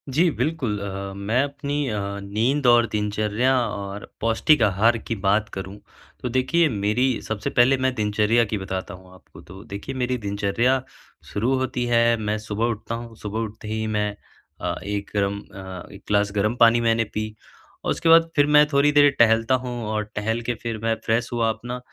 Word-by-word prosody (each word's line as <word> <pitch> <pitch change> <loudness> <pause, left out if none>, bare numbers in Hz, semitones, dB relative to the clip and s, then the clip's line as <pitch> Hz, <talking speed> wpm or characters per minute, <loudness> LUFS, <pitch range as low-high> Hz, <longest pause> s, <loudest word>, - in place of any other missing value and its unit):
जी, 170 +3 +4
बिल्कुल 145 -11 -1
अ, 100 0 -5
मैं 105 +6 0
अपनी 140 0 -3
अ, 105 -2 -2 0.2
नींद 120 +8 0
और 120 -1 +6
दिनचर्या 105 +4 0
और 100 -1 -6
पौष्टिक 115 +5 +3
आहार 110 +3 +3
की 115 0 -4
बात 100 +1 +1
करूँ, 95 +1 -6 0.4
तो 125 - -2
देखिए 130 +7 +2
मेरी 110 +4 0
सबसे 110 -2 -3
पहले 130 +2 +4
मैं 130 0 0
दिनचर्या 105 +2 +2
की 110 - 0
बताता 95 -2 -5
हूँ 95 0 -14
आपको। 95 - -16
तो 95 +3 -12
देखिए, 100 +7 -7
मेरी 125 0 -1
दिनचर्या 105 +5 0 0.5
शुरू 120 +6 +1
होती 130 -1 -2
है, 115 -1 +3
मैं 105 -1 -2
सुबह 110 +1 -2
उठता 115 0 -3
हूँ, 115 -1 -8
सुबह 105 0 -5
उठते 110 -1 -6
ही 110 0 -2
मैं 105 -1 -1 0.5
अ, - - -1
एक 100 0 -5
अम, 100 0 0
अ, 95 -3 -10
1 - - -12
ग्लास 105 0 +2
गर्म 105 +3 +1
पानी 115 0 +6
मैंने 115 0 +2
पी 110 0 -3 0.5
और - - +1
उसके 165 - 0
बाद 165 0 +6
फिर 145 - +5
मैं 150 0 +8
थोड़ी 140 +1 +4
देर 145 0 +6
टहलता 115 +2 +4
हूँ 125 - -4
और 110 0 -1
टहल 110 +3 -1
के 120 +1 -2
फिर 115 -2 -3
मैं 115 0 +1
फ्रेश 115 +1 +1
हुआ 115 -1 +1
अपना, 120 +3 -4
110 Hz, 185 wpm, -23 LUFS, 105-125 Hz, 0.5 s, मैं